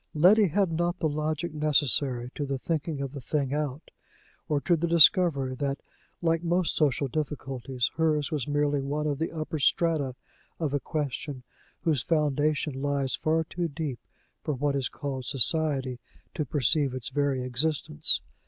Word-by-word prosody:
Letty 195 +7 +6
had 185 +2 +1
not 175 +2 -1
the 160 - 0
logic 155 +2 -2
necessary 140 -4 +1
to 145 - -4
the 140 -1 -2
thinking 155 0 -3
of 135 -1 -4
the 140 -1 -8
thing 140 0 -1
out; 150 0 -3 0.6
or 150 - +2
to 175 - +2
the 170 +1 -1
discovery 165 -5 +5
that, 140 +1 -2 0.5
like 165 -1 +2
most 175 0 +1
social 140 -2 +1
difficulties, 135 -3 -3
hers 155 -2 +1
was 145 -6 -2
merely 145 -1 +1
one 145 +2 -2
of 145 -2 -1
the 165 - -2
upper 155 -1 -4
strata 145 -3 +1 0.4
of 155 -4 -1
a 145 - +1
question 145 -2 -4 0.4
whose 155 -6 +1
foundation 150 -2 0
lies 140 -2 0
far 160 +1 +1
too 170 +2 -3
deep 145 -4 -5 0.4
for 150 - -2
what 140 +2 0
is 135 -2 -1
called 135 -3 -5
Society 135 -1 +2 0.3
to 150 - -2
perceive 140 0 +2
its 130 -1 -4
very 140 -2 0
existence. 130 - +2
145 Hz, 160 wpm, -27 LUFS, 135-160 Hz, 0.6 s, Letty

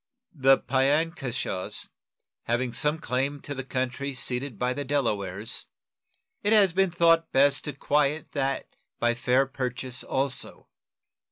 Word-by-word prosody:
The 135 -3 +5
Piankeshaws 135 - -1 0.6
having 120 +1 0
some 150 +5 +2
claim 140 0 -2
to 145 - -5
the 135 -1 -5
country 130 +1 -3
ceded 130 -1 -2
by 125 +2 0
the 145 - -3
Delawares, 105 -8 -1 0.7
it 205 +2 +2
has 200 -5 +5
been 195 +1 +3
thought 165 -1 +3
best 140 +1 +4
to 150 - -3
quiet 150 +2 0
that 135 -1 -2 0.2
by 120 0 +2
fair 125 +3 +2
purchase 125 -1 -3
also. 135 -1 -2
135 Hz, 125 wpm, -27 LUFS, 125-145 Hz, 0.7 s, The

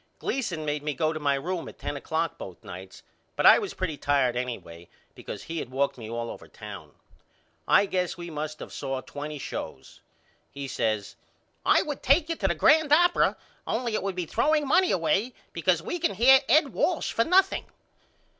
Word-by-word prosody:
Gleason 180 -12 -3
made 150 0 -1
me 150 -1 -3
go 155 +4 0
to 155 - -4
my 140 -2 +2
room 170 +5 -3
at - - -14
ten - - -4
o'clock 160 +4 -2
both 90 -3 -9
nights 95 +1 -10 0.3
but - - 0
I - - +9
was - - -5
pretty 170 -6 -3
tired 140 -4 +1
anyway 115 -9 -5 0.2
because - - -8
he 165 0 -4
had 125 - -6
walked 140 +2 0
me 110 -3 -9
all 115 0 -4
over - - -11
town. - - -10 0.7
I 200 - +5
guess 180 -2 -2
we 175 -1 -7
must 155 0 -5
of - - -8
saw 135 -2 -3
twenty 145 +4 -7
shows. - - -7 0.5
He 140 -1 -7
says 110 -5 -2 0.5
I - - +4
would 295 -2 -5
take 300 +5 +3
you 330 - 0
to 195 - 0
the 170 - 0
grand 305 - +4
opera 350 +3 +4 0.3
only 235 0 -1
it - - 0
would 195 -1 -3
be 180 -1 -2
throwing 300 - +1
money 365 +6 +4
away 190 +8 +1 0.2
because 170 -1 +1
we 350 - -3
can 335 - 0
hear 260 +6 +7
Ed 295 +3 +5
Walsh 330 +1 0
for 230 - +2
nothing. 380 +6 +3
165 Hz, 190 wpm, -27 LUFS, -, 0.7 s, I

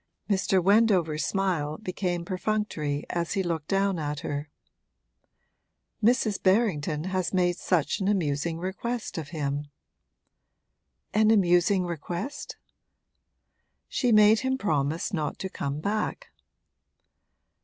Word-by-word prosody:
Mr. 190 -1 +2
Wendover's 190 -7 +3
smile 170 -6 -1
became 180 -4 -3
perfunctory 185 -7 -2
as 170 -1 -1
he 195 - 0
looked 165 -4 -3
down 195 -2 +1
at 150 -1 -3
her. 145 +1 -4 1.5
'Mrs. 220 -3 +2
Berrington 180 -7 +1
has 185 0 -1
made 175 -1 +2
such 170 -4 0
an 195 - -1
amusing 165 -4 0
request 195 +4 -4
of 155 - -7
him.' 145 -2 -3 1.5
'An 215 +1 +4
amusing 185 -2 +4
request?' 175 - -5 1.3
'She 245 -3 +1
made 215 0 +6
him 260 0 0
promise 160 - -1
not 155 -4 -2
to 190 - -4
come 140 -4 -4
back.' 215 - -2
180 Hz, 110 wpm, -27 LUFS, 155-205 Hz, 1.5 s, made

